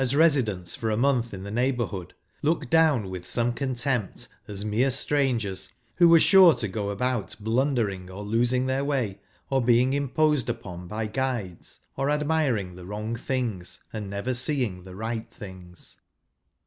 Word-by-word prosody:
[Conducted 135 +1 +1
hj - - +3
residents 115 - +2
for 115 -4 -2
a 105 - 0
month 125 -2 +2
in 95 -1 -7
the 100 - -6
neighbourhood,, 120 -7 -1 0.3
looked 150 -3 0
down 150 -12 +3
with 90 -1 -7
some 120 0 +1
contempt 125 -4 -2 0.2
as 100 0 -3
mere 115 +6 +2
strangers, 120 -9 0 0.2
who 175 -2 +7
were 165 0 +8
sure 185 -2 +7
to 120 -3 -2
go 100 +1 -3
about 105 -1 -2
blunder¬ 115 0 +1
ing, 90 -1 -10
or 95 +2 -7
losing 120 +4 +1
their 130 +1 0
way, 130 -9 -1 0.3
or 135 -1 +3
being 125 +2 +3
imposed 145 0 +1
upon 90 -1 -6
by 110 +4 -3
guides, 110 -6 -4
or 135 +1 0
admiring 145 - 0
the 90 0 -11
wi'ong 105 +4 -4
things, 115 -8 -3
and 105 -3 -5
never 100 +6 -2
seeing 120 -8 -1
the 95 -1 -10
right 110 +2 -4
things. 90 -3 -11
120 Hz, 165 wpm, -26 LUFS, 100-135 Hz, 0.3 s, were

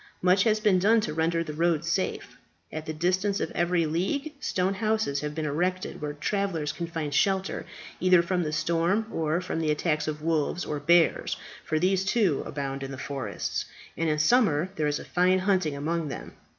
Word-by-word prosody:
Much 185 +1 +5
has 215 -1 +3
been 205 -4 +3
done 220 +5 +4
to 155 -8 -2
render 165 +1 +1
the 155 -2 -6
road 165 0 +1
safe. 175 +3 -2 0.4
At 155 0 -5
the - - -1
distance 185 +5 0
of - - -2
every 175 -1 +1
league 195 - -1
stone 185 -5 0
houses 215 -8 0
have 150 0 -4
been 155 -1 -2
erected, 180 +5 -2
where 150 -1 -3
travellers 165 -1 -1
can 170 +2 -5
find 160 -4 -4
shelter 190 +4 +1 0.3
either 180 -1 +5
from 180 +1 0
the 155 -3 -2
storm 170 +7 +1
or 160 +2 0
from 180 -3 -3
the 160 -1 0
attacks 150 0 0
of 150 0 -4
wolves 165 +2 0
or 150 - -3
bears, 170 +3 +3 0.3
for 155 - -1
these, 185 +3 +2
too, 195 - +2
abound 135 -1 -4
in 135 - -4
the 135 - -6
forests, 135 0 -3 0.3
and 165 -1 0
in 150 - +1
summer 170 - +3
there 155 -4 0
is 145 0 0
fine 180 +1 +3
hunting 185 -6 +1
among 160 +3 -2
them. 140 - -7
170 Hz, 190 wpm, -27 LUFS, 150-185 Hz, 0.4 s, Much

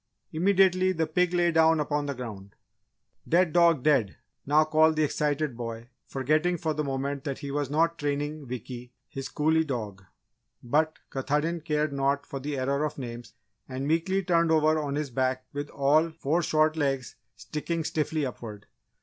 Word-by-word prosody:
Immediately, 185 +1 +3
the 165 -2 0
pig 175 +3 +1
lay 175 -1 +2
down 160 0 +4
upon 150 -1 -1
the 140 - -3
ground. 105 -6 -8 0.7
"Dead 175 -1 +3
dog, 170 -6 +4
Dead!" 135 -10 +2 0.3
now 150 +2 +5
called 155 +1 +3
the 155 - +2
excited 150 -2 0
boy, 115 0 -6 0.2
forgetting 155 +6 +1
for 160 -1 -1
the 150 0 -2
moment 140 0 -3
that 140 -2 -3
he 140 - -6
was 145 -1 -1
not 165 +3 +1
training 145 0 -2
Wickee, 125 0 -7 0.2
his 135 0 -6
collie 160 +2 +2
dog. 110 -9 -5 0.6
But 155 +6 +1
Katahdin 150 +5 -1
cared 150 -2 -1
naught 140 +1 0
for 135 - -6
the 145 +1 -4
error 140 +3 0
of 155 - -3
names, 120 -2 -8 0.3
and 130 +2 -4
meekly 180 +5 +1
turned 170 -2 +2
over 155 0 +3
on 145 -2 -2
his 145 -2 -3
back 130 +1 -1
with 145 0 -4
all 150 +4 +3
four 160 +1 -1
short 155 -1 +2
legs 135 -4 -1 0.2
sticking 165 +2 -4
stiffly 155 -1 -1
upward. 110 -5 -7
150 Hz, 165 wpm, -27 LUFS, 135-160 Hz, 0.7 s, now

